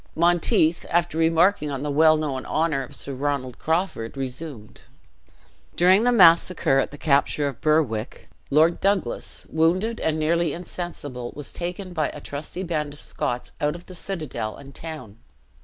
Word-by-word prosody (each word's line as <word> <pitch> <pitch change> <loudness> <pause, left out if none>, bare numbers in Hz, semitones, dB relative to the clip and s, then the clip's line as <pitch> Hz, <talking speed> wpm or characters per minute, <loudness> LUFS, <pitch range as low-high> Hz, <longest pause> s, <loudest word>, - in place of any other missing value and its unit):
Monteith, 170 -1 +3
after 175 -1 +1
remarking 165 0 +3
on 135 -1 -4
the 150 - -2
well 155 +2 +5
known 140 -4 -3
honor 155 -3 +1
of 135 +2 -8
Sir 140 - -5
Ronald 135 -2 -2
Crawford, 160 -8 -1
resumed. 130 -4 -6 0.9
"During 185 +5 +5
the 245 - +4
massacre 170 - +5
at - - 0
the 145 - -10
capture 145 0 +2
of 135 -4 -6
Berwick, 140 -8 0 0.2
Lord 160 +4 +4
Douglas, 195 -11 -1
wounded, 185 +8 +1
and 160 -1 0
nearly 165 0 +1
insensible, 145 -8 -6
was 145 -2 -5
taken 180 +2 -5
by 155 -3 0
a - - -8
trusty 150 +6 -6
band 155 -5 -2
of - - -16
Scots 125 0 -3
out 150 +1 +1
of 175 - -11
the 185 - -11
citadel 160 - -5
and 140 0 -12
town. 135 -11 -9
155 Hz, 155 wpm, -24 LUFS, 140-170 Hz, 0.9 s, well